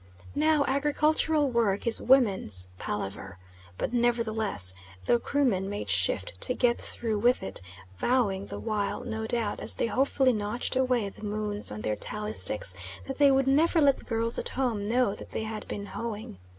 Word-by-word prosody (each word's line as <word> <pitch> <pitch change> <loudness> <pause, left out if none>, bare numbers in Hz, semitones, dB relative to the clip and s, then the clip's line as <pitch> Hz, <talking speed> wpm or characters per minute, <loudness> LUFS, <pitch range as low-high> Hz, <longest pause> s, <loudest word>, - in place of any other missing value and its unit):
Now 300 0 +3
agricultural 295 +1 +2
work 220 -5 +1
is 230 - +2
"woman's 190 - +3
palaver," 95 -2 -5 0.4
but - - -2
nevertheless 220 - +1 0.3
the 240 - +3
Krumen 235 -10 +1
made 205 0 -4
shift - - 0
to 250 - 0
get 240 -1 +2
through 220 -3 -2
with 245 +4 +3
it, 95 - -1 0.4
vowing 205 - +1
the - - -6
while 215 +1 -2
no 220 -2 -4
doubt, 225 -3 0
as - - -1
they - - 0
hopefully 260 +3 +2
notched 215 +4 -2
away 250 -5 +1
the - - -15
moons 210 - -3
on 105 0 -6
their 105 0 -1
tally 210 - -4
sticks, 95 0 -1 0.3
that 270 0 -6
they 285 -1 +7
would 270 -1 +3
never 310 +5 +4
let 280 -3 +5
the - - -13
girls 230 0 0
at - - -2
home 240 -6 -1
know 235 -1 +2
that - - -9
they - - -3
had 220 -1 -5
been 200 - -5
hoeing. 210 - -6
230 Hz, 175 wpm, -28 LUFS, 205-260 Hz, 0.4 s, they